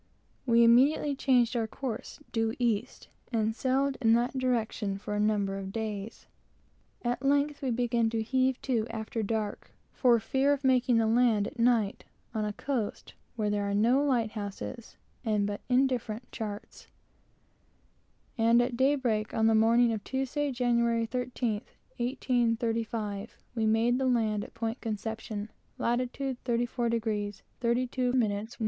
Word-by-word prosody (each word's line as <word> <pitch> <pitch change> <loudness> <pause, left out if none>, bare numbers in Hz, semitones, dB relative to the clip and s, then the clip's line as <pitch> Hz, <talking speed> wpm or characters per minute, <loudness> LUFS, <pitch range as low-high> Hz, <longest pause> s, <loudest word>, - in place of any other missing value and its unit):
We 235 0 +5
immediately 275 +5 +4
changed 250 -3 +2
our 230 -2 0
course 245 0 -6
due 225 -1 0
east, 230 -5 -1 0.2
and 220 -1 0
sailed 270 +2 +1
in 225 -2 +5
that 240 +3 +1
direction 230 -6 -1
for 205 +1 -5
a 205 - -1
number 205 -2 +1
of 190 0 -6
days. 215 -1 -5 0.8
At 245 +1 -1
length 285 +1 +1
we 270 - -1
began 235 -1 +1
to 225 -1 -1
heave 260 +2 +1
to 235 -4 0
after 225 0 -4
dark, 215 -1 -3 0.2
for 240 -3 +4
fear 270 +5 +2
of 285 0 -4
making 255 -2 +3
the 225 - +3
land 225 -2 +3
at 260 - -8
night 230 -4 +2 0.3
on 215 -2 -1
a 210 - -2
coast 240 -3 -3 0.2
where 210 -3 0
there 205 -1 -1
are 200 - 0
no 240 +7 +3
light 240 -6 +1
houses 215 +2 -7 0.3
and 210 -3 +1
but 205 0 -4
indifferent 250 -3 0
charts, 210 -2 -7 1.5
and 230 +1 +5
at 245 0 +1
daybreak 255 -5 +1
on 220 - +2
the 225 - +5
morning 230 +2 +4
of 210 -2 -4
Tuesday, 270 +3 -1
Jan 245 -1 +1
13th, 230 -1 0 0.9
1835, 230 -4 -1 0.2
we 225 -2 0
made 230 +3 +3
the 265 - +1
land 220 -4 +1
at - - -12
Point 225 +2 -3
Conception, 220 -1 -4 0.3
lat 240 +1 +1
34º 235 -5 -2 0.2
32' 250 +1 0
N. 210 -2 0
230 Hz, 145 wpm, -29 LUFS, 220-250 Hz, 1.5 s, We